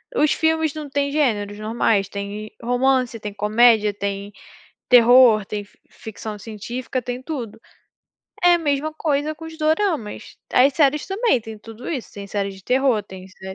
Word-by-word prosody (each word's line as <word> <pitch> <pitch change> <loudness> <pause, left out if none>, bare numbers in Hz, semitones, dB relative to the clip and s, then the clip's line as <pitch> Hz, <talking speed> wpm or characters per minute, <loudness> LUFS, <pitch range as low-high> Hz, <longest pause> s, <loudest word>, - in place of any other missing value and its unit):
os 305 -8 +3
filmes 320 -1 +1
não 300 -2 -7
têm 280 0 -1
gêneros 210 -9 0
normais? 215 -2 +1
Tem 205 +2 -6
romance, 245 0 +1
tem 210 -1 -6
comédia, 215 +1 +3
tem 200 0 -4 0.6
terror, 245 -3 +7
tem 205 0 -5
fi - - -27
ficção 215 -1 -8
científica, 230 +5 -5
tem 245 +1 -5
tudo. 245 -8 -6 0.8
É 355 0 +6
a - - +2
mesma 300 -1 -1
coisa 305 -1 -1
com 315 +2 -12
os 320 0 -9
doramas. 310 - -1 0.2
As 265 +3 +5
séries 295 0 +2
também, 395 - +1
tem 220 -1 -9
tudo 225 +3 -10
isso, 280 -8 -4
tem 200 -1 -8
séries 200 -1 -3
de 190 - -17
terror, 255 -3 +2
tem 190 -2 -12
sé 190 0 -10
240 Hz, 165 wpm, -21 LUFS, 210-285 Hz, 0.8 s, terror